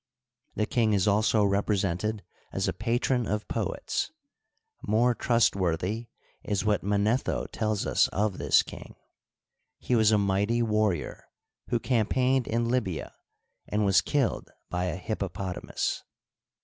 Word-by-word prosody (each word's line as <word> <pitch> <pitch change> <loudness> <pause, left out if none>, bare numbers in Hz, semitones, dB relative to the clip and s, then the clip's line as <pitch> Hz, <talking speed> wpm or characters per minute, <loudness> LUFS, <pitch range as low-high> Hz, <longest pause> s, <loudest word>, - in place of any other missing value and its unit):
The 105 - +1
king 110 -1 +1
is 100 0 +2
also 105 +1 +3
represented 100 0 0 0.3
as - - -1
a - - 0
patron 120 0 0
of 105 +1 -2
poets. - - -2 0.7
More 120 +3 +2
trustworthy 105 -2 +1 0.4
is 100 -1 -1
what 105 -2 +2
Manetho 105 +5 +1
tells 110 -2 -1
us - - +3
of 100 -1 -1
this - - +4
king. - - -11 0.8
He 125 - -1
was 110 -2 +4
a 105 - +5
mighty 100 +4 +1
warrior, 105 -8 0 0.4
who 120 - +1
campaigned 125 +2 +1
in 115 +1 0
Lybia, 115 -9 -2 0.5
and 105 0 0
was 95 -1 +5
killed 140 -8 -1 0.2
by 90 +1 -1
a 90 - -2
hippopotamus. 95 -2 -3
105 Hz, 125 wpm, -28 LUFS, 100-115 Hz, 0.8 s, a